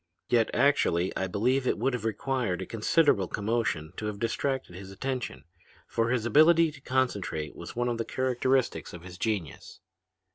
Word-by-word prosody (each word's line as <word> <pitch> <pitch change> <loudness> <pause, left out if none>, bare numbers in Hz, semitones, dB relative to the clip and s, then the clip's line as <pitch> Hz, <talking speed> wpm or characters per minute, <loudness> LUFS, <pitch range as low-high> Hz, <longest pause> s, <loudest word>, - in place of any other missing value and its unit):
Yet 115 -2 +3
actually 95 -11 +2
I 95 - -1
believe 125 +8 +1
it - - +1
would 135 - 0
have 120 -3 -3
required 115 -3 -1
a - - -7
considerable 115 - +2
commotion 105 -7 -1
to 105 - -3
have 105 -1 -4
distracted 125 -1 -2
his 95 +1 -9
attention, 130 +6 -4 0.4
for 115 0 0
his 120 -2 0
ability 155 +6 +5
to 145 -2 -14
concentrate 120 - -1
was - - -9
one 120 +1 0
of 120 -1 -1
the - - +1
characteristics 130 0 0
of 85 -1 -9
his 90 -1 -10
genius. 100 -10 -3
115 Hz, 170 wpm, -28 LUFS, 100-130 Hz, 0.4 s, ability